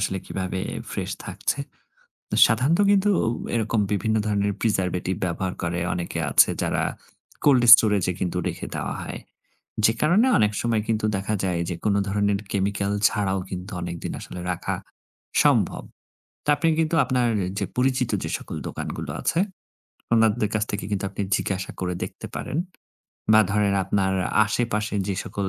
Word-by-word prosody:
আসলে 95 -1 -1
কিভাবে 95 0 -3 0.3
ফ্রেশ - - -3 0.2
থাকছে? - - -2 0.7
তো - - -2
সাধারণত 135 - +2
কিন্তু 205 0 +4
ঔ - - +1 0.3
এরকম 110 -1 +1
বিভিন্ন 110 +2 +1
ধরণের 100 -1 +1
preservative 95 -4 0
ব্যবহার 90 +1 -2
করে, 85 0 -1
অনেকে 85 -1 -4
আছে - - +6
যারা - - 0 0.6
cold 135 -4 +5
storage 105 -5 +3
এ - - -10
কিন্তু 90 -1 -2
রেখে - - -5
দেওয়া - - -3
হয়। - - -6 0.6
যে 110 - +6
কারণে 180 +11 +4
অনেক 105 -1 +3
সময় 115 -2 +1
কিন্তু 110 -1 0
দেখা 100 +2 -2
যায় 90 -2 0
যে, 90 - -2
কোন 105 - +2
ধরনের 100 0 +1
chemical 100 0 0 0.2
ছাড়াও 95 -2 -1
কিন্তু 90 +2 -6
অনেকদিন 85 -1 -5
আসলে 90 - -8
রাখা 90 - -3 0.7
সম্ভব। - - +2 0.6
তা - - +2
আপনি 165 - +1
কিন্তু 160 +1 0
আপনার 125 -2 +1 0.3
যে 100 - 0
পরিচিত 125 -1 +1
যে - - -3
সকল - - -8
দোকানগুলো - - -5
আছে, 165 - +1 0.8
ওনাদের 110 -2 +3
কাছ 105 - +2
থেকে 100 -2 -3
কিন্তু 95 -1 -1
আপনি 100 - -5 0.2
জিজ্ঞাসা 95 -1 -3
করে 90 -1 -2
দেখতে - - -7
পারেন, 140 - -4 0.8
বা 110 - +8
ধরেন 100 -1 +2
আপনার 95 0 +1 0.3
আশেপাশে 105 -1 -1
যে 100 - 0
সকল, 100 -1 -3
100 Hz, 155 wpm, -24 LUFS, 95-115 Hz, 0.8 s, বা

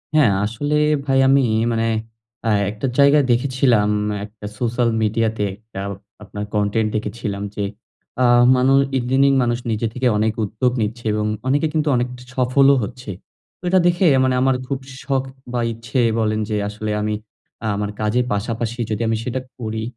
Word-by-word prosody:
হ্যাঁ, 145 -9 +5
আসলে 130 +8 -2 0.3
ভাই 135 -1 +2
আমি 135 0 +5 0.3
মানে 115 0 0 0.6
আ - - +3 0.2
একটা 110 +5 -3
জায়গায় 140 0 +6
দেখেছিলাম, 120 -4 +2 0.4
একটা 105 0 -12
সোশ্যাল 120 0 0
মিডিয়াতে 110 0 0
একটা 110 -1 -11 0.4
আপনার 105 0 -6
কনটেন্ট 105 +1 +1
দেখেছিলাম 105 -1 -3
যে, 105 - -2 0.6
আ - - +5 0.3
মানু 130 +1 +3 0.2
ইদানিং 130 +3 +3
মানুষ 120 0 0
নিজে 110 +1 0
থেকে 125 +1 0
অনেক 110 +1 +1
উদ্যোগ 110 +5 0
নিচ্ছে 115 +2 -3
এবং 105 0 -1 0.2
অনেকে 145 +4 +2
কিন্তু 155 -1 0
অনেক 125 0 +1 0.3
সফলও 135 +2 +4
হচ্ছে। 125 0 -7 0.5
তো - - -40
এটা 185 - +4
দেখে 175 +1 +2 0.2
মানে 130 -1 +2
আমার 135 -1 +3
খুব 135 0 -2 0.2
শখ 135 0 0 0.3
বা 120 - 0
ইচ্ছে 115 +3 -3 0.2
বলেন 110 -1 0
যে 105 - -1
আসলে 105 0 -4
আমি 105 0 -1 0.5
আ - - 0
আমার 105 0 -2
কাজের 115 +4 +1
পাশাপাশি 115 +3 -3
যদি 110 0 -2
আমি 110 0 +1
সেটা 125 +2 -2 0.2
করি, 110 -1 -3
120 Hz, 160 wpm, -20 LUFS, 110-130 Hz, 0.6 s, জায়গায়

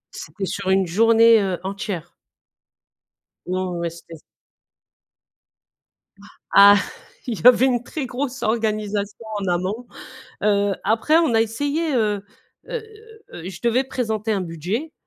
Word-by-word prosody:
C'était 195 -2 -6
sur 190 0 -4
une 190 0 +3
journée, 225 +4 +5
heu, 190 -3 -2
entière. 195 -3 -5 1.3
Non, 185 0 -2
ouais, - - -4
ouais, 170 - -2
c'était 165 0 -12 2.4
Ah, 200 +1 +8 0.5
il 230 -5 -3
y 245 - +6
avait 250 +1 +7
une 245 -2 +1
très 280 +2 -5
grosse 260 +1 -4
organisation 215 -1 -2 0.2
en 195 - -3
amont, 185 +7 -2 0.6
heu, 205 -1 +2
après 225 +9 +2
on 310 -9 +2
a 225 - +4
essayé, 290 +7 -2
heu, 210 -3 0 0.4
heu, 475 -3 -4 0.5
heu, 175 +2 -8
je 190 - -9
devais 240 +3 +2
présenter 220 -4 -2
un 200 - 0
budget, 185 - -4
215 Hz, 130 wpm, -22 LUFS, 195-240 Hz, 2.4 s, Ah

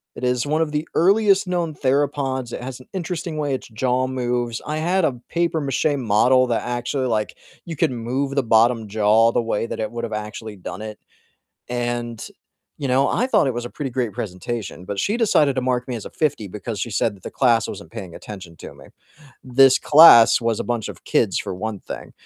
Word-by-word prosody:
It - - -9
is 125 +1 +1
one 155 +2 0
of 155 -2 -1
the 150 +1 -2
earliest 200 +1 +4
known 170 -4 -2
theropods, 135 -2 -1
it - - -6
has 130 0 -7
an 130 - -16
interesting 170 -3 -4
way 145 -2 -1
its 130 - -4
jaw 125 +3 0
moves, 120 -2 -2
I 150 +1 -3
had 175 +2 +1
a 125 -3 -2
papier-mâché 155 -4 0
model 125 +3 +3
that 115 - -1
actually, 120 +2 -2
like 110 -2 -2 0.3
you 165 -2 -6
could 130 - +1
move 130 +4 -3
the 140 - +2
bottom 115 0 +3
jaw 110 +2 +3
the - - +1
way 115 -1 -2
that - - -6
it 110 0 -3
would've 115 -2 -5
actually 105 0 -6
done 95 +2 -8
it, 110 -1 -7 0.7
and, 120 -1 -3 0.5
you 140 - -3
know, 135 +2 +3
I 250 +3 0
thought 210 - +3
it 130 - 0
was 120 0 -4
a - - -6
pretty 140 -4 -5
great 120 -4 -1
presentation, 100 +1 -5
but 100 +1 -5
she 210 - 0
decided 150 - +3
to 130 - 0
mark 125 0 -1
me 125 - -3
as 110 - -6
a - - -7
50 135 - -2
because 105 +1 -6
she 120 - -3
said 105 0 0
that 95 - -21
the - - -7
class 120 -4 +2
wasn't 100 +2 -9
paying 95 -7 -8
attention 90 -6 -10
to - - -10
me. - - -15 0.6
This 130 +1 +5
class 145 -8 +8
was 115 -2 -1
a - - -2
bunch 120 -3 -2
of - - -10
kids - - +1
for - - -4
one 105 +2 -5
thing, - - -8
125 Hz, 215 wpm, -21 LUFS, 110-145 Hz, 0.7 s, class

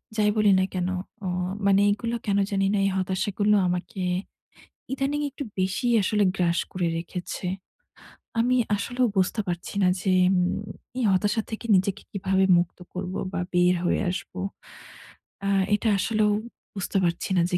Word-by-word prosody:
যাই 210 -1 +3
বলি 210 -1 +5
না 185 - +3
কেনো? 185 0 -1 0.3
অ - - -1 0.4
মানে 200 0 +5
এইগুলো 230 +3 -1
কেনো 200 -1 +2
জানিনা 195 +1 +1
এই - - +3
হতাশাগুলো 190 +3 +1
আমাকে 180 +2 -3 0.9
ইদানিং 275 +2 -1
একটু 280 +1 -6
বেশিই 190 +6 +1
আসলে 210 +1 +2
গ্রাস 170 -2 +1
করে 180 -2 0
রেখেছে। 175 +2 -5 1.0
আমি 250 +2 +2 0.2
আসলেও 245 +5 0
বুঝতে 185 +4 +1
পারছি 175 +2 -4
না - - +5
যে, 190 - -1 0.3
উম 180 +2 +1 0.4
এই 255 - 0
হতাশা 205 +4 +2
থেকে 220 +1 -5
নিজেকে 190 +1 +1
কীভাবে 190 -1 +1
মুক্ত 175 0 -1 0.2
করব, 185 0 -4 0.2
বা - - -1
বের 180 0 +4
হয়ে - - +1
আসবো। 180 +1 -6 1.1
আ - - +2 0.3
এটা 220 +2 0
আসলেও 215 0 +2 0.4
বুঝতে 195 0 -2
পারছি 170 -1 -1
না - - +5
যে 180 - +3
195 Hz, 150 wpm, -25 LUFS, 180-210 Hz, 1.1 s, বলি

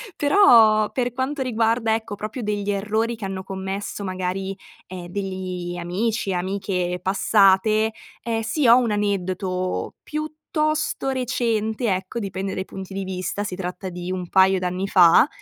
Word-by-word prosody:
Però, 230 - +5
per 245 -1 -1
quanto 265 +3 -2
riguarda, 230 -2 +1
ecco, 220 -2 -5
proprio 215 +4 -5
degli 205 -1 -2
errori 215 +3 0
che 220 - -7
hanno 190 -1 -4
commesso 195 +2 -5
magari, 190 +1 -3 0.3
ehm, 180 -1 -8
degli 185 -2 -4
amici, 195 +4 -1
amiche 180 -1 -2
passate, 205 +3 +3 0.3
ehm, 225 -1 -2
sì 235 +5 0
ho 235 +2 +8
un 240 -3 +1
aneddoto 185 -2 -2
piuttosto 310 -1 -2
recente, 230 -3 -1
ecco, 190 +5 -5
dipende 195 -2 -4
dai 190 - -3
punti 190 0 -8
di 195 - -3
vista 185 +2 -3
si 185 -3 -4
tratta 185 0 -5
di 180 +1 -6
un 180 -2 -4
paio 190 0 +4
d'anni 180 +2 -2
fa, 180 - +6
200 Hz, 145 wpm, -23 LUFS, 185-225 Hz, 0.3 s, ho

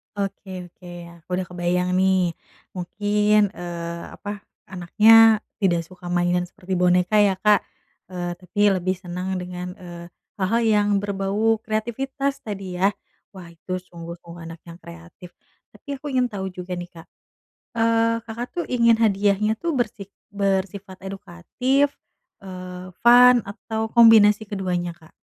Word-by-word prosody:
Oke 190 -3 -5
oke, 180 - -16
ya 175 -1 -9
aku 165 - -34
udah 185 0 -2
kebayang 180 +1 -1
nih 185 -2 +2 0.4
mungkin, 205 +3 +1
eee, 170 -2 -6
apa 205 0 -7 0.3
anaknya 220 +5 +5 0.2
tidak 175 -4 +1
suka 180 +1 -13
mainan 175 0 +1
seperti 185 +1 -7
boneka 180 +3 +3
ya 200 -2 +4
Kak, 210 0 +5 0.5
eee, 175 -1 -4
tapi 185 +2 -8
lebih 185 0 0
seneng 180 +1 -5
dengan, 180 0 -6
eee, 175 -3 -10 0.3
hal-hal 200 +5 +1
yang 210 -2 +3 0.2
berbau 205 +3 0
kreatifitas 265 +6 -3
tadi 195 -4 -6
ya, 195 +2 +3 0.4
wah 180 -3 -11
itu 185 +2 -5
sungguh-sungguh 170 -1 -11
anak 165 0 -9
yang 170 -1 -12
kreatif, 85 - -13 0.4
tapi 285 -2 -7
aku 290 +2 -7
ingin 250 -1 +2
tahu 190 -2 -4
juga 180 0 -6
nih 175 0 -7
Kak, 165 -1 -13 0.7
eee, 230 0 +2
Kakak 235 +2 -5
tuh 350 - -2
ingin 235 -2 +4
hadiahnya 205 0 +2
tuh 335 +5 -2
bersi 215 -4 -2 0.3
bersifat 195 -1 -2
edukatif, 210 +9 -1 0.5
eee, 185 -1 -8 0.2
fun 245 +1 +8
atau 220 +2 -4
kombinasi 220 -2 +6
keduanya 180 -3 -3
Kak? 160 -2 -21
190 Hz, 140 wpm, -23 LUFS, 180-215 Hz, 0.7 s, fun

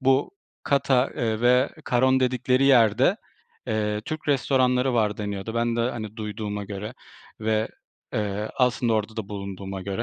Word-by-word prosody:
bu 135 +4 +2 0.3
Kata, 140 -2 +2
ııı, 110 -2 -1
ve 125 +2 +4 0.2
Karon 130 +2 +3
dedikleri 130 +1 +2
yerde, 125 - +5 0.5
eee, 105 -2 -1
Türk 155 -1 -5
restoranları 130 -2 +2
var 105 -3 +1
deniyordu. 100 +1 -4
Ben 115 0 0
de, - - +1
hani, 110 -3 -3
duyduğuma 105 -1 -4
göre 105 +3 -6 0.5
ve, 110 0 0 0.4
eee, 105 0 -2
aslında 125 -2 +2
orada 110 0 -1
da 110 -3 -4
bulunduğuma 100 -1 -6
göre 100 +4 -3
115 Hz, 145 wpm, -25 LUFS, 105-125 Hz, 0.5 s, yerde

